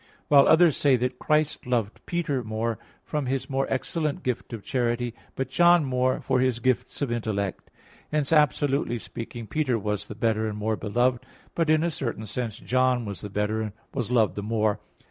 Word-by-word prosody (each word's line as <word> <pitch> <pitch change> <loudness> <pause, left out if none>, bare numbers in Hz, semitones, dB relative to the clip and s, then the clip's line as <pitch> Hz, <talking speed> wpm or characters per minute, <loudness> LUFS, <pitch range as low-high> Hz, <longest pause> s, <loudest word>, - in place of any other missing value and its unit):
While 140 -2 +7
others 165 -2 +5
say 140 -3 +4
that 125 +1 -2
Christ 150 -3 0
loved 115 -4 -1
Peter 150 -7 -1
more, 110 +1 -2 0.2
from 150 -4 -3
his 135 +1 -2
more 135 0 0
excellent 150 +3 -1
gift 125 -2 -3
of 115 -4 -6
charity; 120 -2 -1 0.2
but 135 - -2
John 175 +2 +5
more, 130 0 +1
from 130 -1 +1
his 130 -2 +2
gifts 130 +3 -1
of 130 - -2
intellect. 105 -5 -2 0.4
Hence, 150 0 +1
absolutely 145 -4 +2
speaking, 115 0 -7
Peter 135 -1 0
was 105 -1 -3
the 105 - -7
better 110 -1 +1
and 105 -1 -4
more 110 +1 0
beloved; 120 +4 0 0.3
but, 165 -2 0
in 155 0 +4
a 170 - +1
certain 115 -7 -4
sense, 115 0 -4
John 130 -1 +1
was 100 -2 -6
the 105 - -6
better, 105 +2 -1
and 105 -2 -4 0.2
was 120 -4 -2
loved 115 -4 +3
the 105 - -4
more. 110 0 0
125 Hz, 185 wpm, -26 LUFS, 110-140 Hz, 0.4 s, While